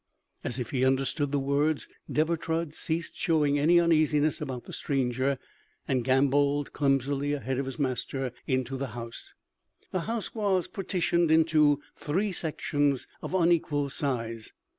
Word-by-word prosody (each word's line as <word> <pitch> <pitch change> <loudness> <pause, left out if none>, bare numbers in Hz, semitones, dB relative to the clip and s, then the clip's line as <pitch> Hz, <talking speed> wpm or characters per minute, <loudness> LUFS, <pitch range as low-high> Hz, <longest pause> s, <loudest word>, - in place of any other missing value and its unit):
As 120 - -2
if 125 -3 -4
he 130 -2 +1
understood 135 +2 +1
the 145 - +1
words, 140 +3 +1 0.2
Deber 160 +2 +2
Trud 165 -1 -2
ceased 165 +1 -3
showing 150 -3 +2
any 170 +4 +5
uneasiness 155 -3 +3
about 130 -4 -4
the - - -10
stranger, 130 -1 0 0.5
and 130 -2 +1
gamboled 140 +2 +2
clumsily 140 0 +1
ahead 130 -2 -2
of 135 - -2
his 135 - -5
master 135 -1 -2 0.2
into 130 0 0
the 135 +1 -3
house. 115 -1 -8 0.6
The 185 - 0
house 230 -2 -3
was 200 -5 +1
partitioned 175 -3 0
into 155 -2 +4
three 190 +7 -1
sections 145 -5 0 0.2
of - - -4
unequal 160 -5 +2
size. 115 -6 -3
145 Hz, 140 wpm, -28 LUFS, 135-160 Hz, 0.6 s, any